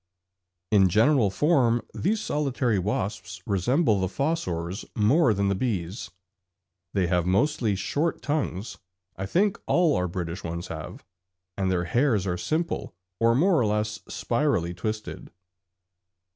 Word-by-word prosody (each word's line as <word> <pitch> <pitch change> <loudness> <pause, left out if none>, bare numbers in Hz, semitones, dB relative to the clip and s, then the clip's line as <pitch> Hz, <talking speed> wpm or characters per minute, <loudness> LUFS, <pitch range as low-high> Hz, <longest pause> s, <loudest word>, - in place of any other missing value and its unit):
In 95 -3 +5
general 115 +2 +4
form 120 - +2
these 215 +4 0
solitary 135 - 0
wasps 100 +1 -3
resemble 110 - +2
the 95 - 0
fossors 95 - -2
more 120 +6 +4
than 100 -1 +1
the 100 - +2
bees; 95 -4 -3 0.9
they 95 -2 +2
have 90 0 +1
mostly 110 +1 +1
short 145 - -1
tongues 135 - -2 0.4
(I 95 - -4
think 195 - +1
all 170 -4 +3
our 90 - 0
British 90 0 -5
ones 85 +1 -5
have), - - -7 0.5
and 95 -1 0
their 90 -2 +1
hairs 115 0 +1
are 90 -2 -1
simple 155 - -2 0.2
or 115 0 +4
more 175 +4 +4
or - - +2
less 105 0 -1
spirally 115 - 0
twisted. 110 +4 -5
105 Hz, 130 wpm, -26 LUFS, 95-140 Hz, 0.9 s, In